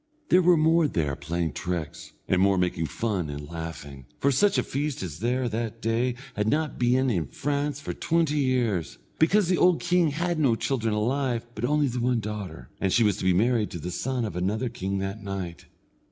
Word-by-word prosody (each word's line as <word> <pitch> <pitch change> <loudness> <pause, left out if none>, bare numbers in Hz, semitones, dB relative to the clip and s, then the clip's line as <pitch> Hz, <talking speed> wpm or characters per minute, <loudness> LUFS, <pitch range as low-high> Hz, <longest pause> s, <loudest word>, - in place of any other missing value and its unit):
There 185 - +6
were 175 -1 +5
more 160 +1 +4
there 75 - -1
playing 80 +2 -2
tricks, 85 -3 -4
and 95 -1 +2
more 100 0 +4
making 90 -3 0
fun 95 -1 -2
and 75 0 -6
laughing, 75 -5 -7
for 140 - +2
such 200 +9 +3
a - - +2
feast 145 -4 -3
as 80 -4 -6
there 125 +4 0
was 120 - -2
that 115 0 -3
day 115 +3 0 0.2
had 105 +1 0
not 155 +5 0
been 125 +1 +3
in 85 -8 -1
France 145 - -2
for 145 - -5
twenty 160 -3 +1
years, 120 - 0 0.2
because 180 +4 +4
the 180 0 +2
old 180 -2 +5
king 175 -1 +2
had 170 +3 -1
no 135 -7 +3
children 115 -3 -1
alive 120 +2 0
but 105 +2 -2
only 150 +2 +2
the 125 -1 -2
one 120 0 +1
daughter, 105 -6 -6
and 95 - 0
she 115 - +4
was 105 -3 +2
to - - -6
be 95 - +4
married 115 +2 +2
to - - -6
the 90 +3 -5
son 125 +4 -2
of 105 - -5
another 105 +7 -1
king 100 -5 -3
that 95 +2 -4
night. 95 -4 -6
115 Hz, 210 wpm, -26 LUFS, 90-140 Hz, 0.2 s, There